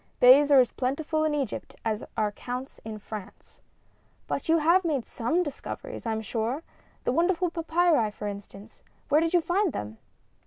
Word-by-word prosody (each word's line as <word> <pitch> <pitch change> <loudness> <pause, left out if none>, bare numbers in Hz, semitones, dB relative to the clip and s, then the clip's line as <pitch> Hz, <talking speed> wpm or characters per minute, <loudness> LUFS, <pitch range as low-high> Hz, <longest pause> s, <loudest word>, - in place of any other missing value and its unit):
"Beys 270 +4 +8
are 280 -2 +7
as 250 - +4
plentiful 305 +4 -1
in 305 -1 +1
Egypt 270 -8 -4
as 220 -1 -1
are 215 -1 +1
counts 250 +5 -6
in 220 -1 -6
France." 205 -1 -10 0.6
"But 280 - -4
you 330 - +5
have 340 +4 +4
made 290 -8 -1
some 320 +10 0
discoveries, 315 - -7
I - - 0
am 220 0 -2
sure. 235 +7 -2 0.4
The - - +1
wonderful 345 +4 +1
papyri, 330 -7 +2
for 210 0 -6
instance 200 +1 -9 0.3
where 295 +2 +5
did 330 +2 +1
you 350 - +5
find 365 +1 +1
them?" 105 +1 -6
275 Hz, 170 wpm, -27 LUFS, 220-330 Hz, 0.6 s, Beys